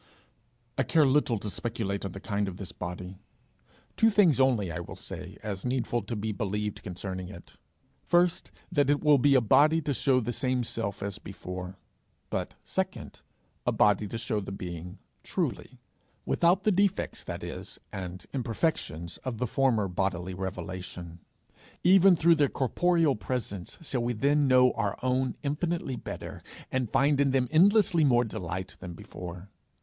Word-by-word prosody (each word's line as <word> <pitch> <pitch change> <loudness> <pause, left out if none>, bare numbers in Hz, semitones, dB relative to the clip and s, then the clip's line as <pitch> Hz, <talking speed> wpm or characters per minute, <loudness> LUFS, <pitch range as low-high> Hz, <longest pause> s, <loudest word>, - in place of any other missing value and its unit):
I - - +5
care 155 +5 +4
little 135 -3 +3
to 105 - -6
speculate 105 -4 -3
on 95 -2 -4
the 95 - -7
kind 100 0 -1
of 90 -2 -6
this 95 -2 -7
body; 90 +1 -7 0.8
two 225 - +5
things 195 -10 +4
only 120 -9 +3
I 80 - -4
will 85 - -7
say, - - -8
as 100 -3 -4
needful 125 -1 0
to 110 +4 -5
be 110 +1 -2
believed, 105 0 -3
concerning 95 -1 -5
it: 90 -4 -12 0.5
first, 175 0 +2 0.2
that 145 -5 +2
it 145 +1 +2
will 150 -2 +6
be 140 +2 +5
a 130 - +6
body 150 +8 +5
to 145 - 0
show 130 0 +3
the 120 0 -2
same 130 -1 0
self 105 -3 -3
as 100 0 -4
before 90 -2 -7 0.5
but, - - -3
second, - - -4 0.5
a - - +4
body 105 0 +3
to 115 - -4
show 115 -1 -1
the 95 - -6
being 90 -2 -6 0.2
truly - - -3 0.5
without 180 +3 +3
the 215 - +3
defects, 200 0 0
that - - -5
is, - - -7 0.2
and 90 -1 -6
imperfections 115 - -2
of 130 -4 -5
the 125 - 0
former 120 -4 +2
bodily 95 0 -2
revelation. 90 -2 -6 0.6
Even 185 +1 +7
through 170 +1 +5
their 145 -4 +3
corporeal 165 +2 +2
presence 105 -5 -4
shall 130 -5 -2
we 120 +1 0
then 140 +5 +2
know 125 -1 +6
our 105 -3 -2
own 130 0 +1
infinitely 150 -1 -1
better, - - -7 0.3
and 130 -3 0
find 140 +1 +3
in 140 - +3
them 130 -1 +2
endlessly 190 0 +5
more 125 -4 +4
delight, 95 -5 -5
than 90 -2 -7
before. 90 +3 -9
115 Hz, 165 wpm, -29 LUFS, 95-140 Hz, 0.8 s, Even